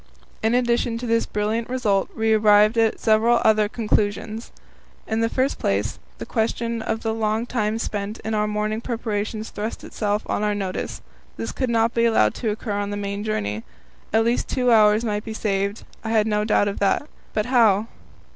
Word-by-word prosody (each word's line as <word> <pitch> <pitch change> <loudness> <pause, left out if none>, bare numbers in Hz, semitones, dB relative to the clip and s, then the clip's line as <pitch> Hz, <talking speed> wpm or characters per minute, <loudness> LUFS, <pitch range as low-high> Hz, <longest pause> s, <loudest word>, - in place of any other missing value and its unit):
In 225 +2 +2
addition 240 -1 +1
to 245 - -5
this 230 -1 +1
brilliant 215 +3 -1
result, 215 -7 +1
we 220 0 +2
arrived 210 0 +5
at 225 -1 +2
several 230 +2 +3
other 215 -1 +4
conclusions. 215 0 -1 0.5
In 220 - -1
the 230 - +2
first 265 +3 0
place, 100 +2 -1 0.2
the - - -6
question 230 0 -1
of 220 0 -2
the 225 -1 -1
long 220 +1 0
time 220 -3 -1
spent 210 -1 -3
in 220 - -2
our 210 0 +1
morning 210 +1 -1
preparations 220 -2 -3
thrust 215 +2 -5
itself 210 0 -2
on - - -1
our 210 0 +1
notice: 190 -2 -4 0.3
this - - -4
could 260 -2 -2
not 230 0 +2
be 230 0 +2
allowed 220 - +3
to 230 - -2
occur 215 +1 -4
on 205 0 -2
the 205 - -3
main 200 0 -3
journey. 105 - -2 0.5
At 225 +1 +3
least 235 +1 +1
two 250 -2 +1
hours 215 0 +5
might 210 -1 -1
be 220 -1 -6
saved, 200 0 -1 0.2
I 220 - -4
had 220 -1 +3
no 210 -1 0
doubt 210 -1 +3
of 200 - -3
that 200 +8 +1 0.2
but 215 - -1
how? 225 -5 +4
220 Hz, 190 wpm, -23 LUFS, 210-230 Hz, 0.5 s, arrived